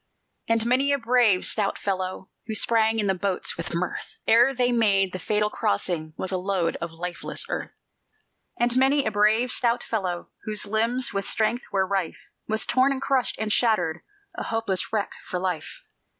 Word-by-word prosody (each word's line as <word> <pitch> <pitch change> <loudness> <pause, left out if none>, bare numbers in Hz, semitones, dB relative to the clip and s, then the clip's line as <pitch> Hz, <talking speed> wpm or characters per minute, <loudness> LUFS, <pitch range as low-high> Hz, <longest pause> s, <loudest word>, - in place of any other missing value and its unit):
And 230 0 +2
many 260 +4 +2
a 280 - +3
brave, 235 -6 +3
stout 205 -2 +1
fellow, 185 -1 -3 0.2
Who 220 - -3
sprang 225 0 +2
in 210 - 0
the 195 - +2
boats 190 0 -2
with 170 0 -5
mirth, 180 +1 -4
Ere 240 +4 +6
they 245 0 +2
made 200 -5 +3
that 185 - -4
fatal 210 +3 0
crossing 155 - -2
Was 190 - -2
a 185 - -1
load 185 -3 -1
of 170 - -5
lifeless 175 +1 -4
earth. - - -3 0.9
And 240 +1 +2
many 270 +2 +3
a 220 - 0
brave, 215 +4 +3
stout 235 -1 +2
fellow, 185 -6 -3
Whose 210 -1 +2
limbs 230 +4 0
with 195 0 -2
strength 230 +2 0
were 190 -1 +2
rife, 190 -3 -3 0.2
Was 220 0 0
torn 260 +2 +3
and 270 - -2
crushed 270 -2 0
and 215 -1 0
shattered, 175 -9 +2 0.4
A - - -4
hopeless 225 -5 0
wreck 215 -2 -1
for 180 - -4
life. 180 -3 -4
215 Hz, 180 wpm, -25 LUFS, 185-235 Hz, 0.9 s, Ere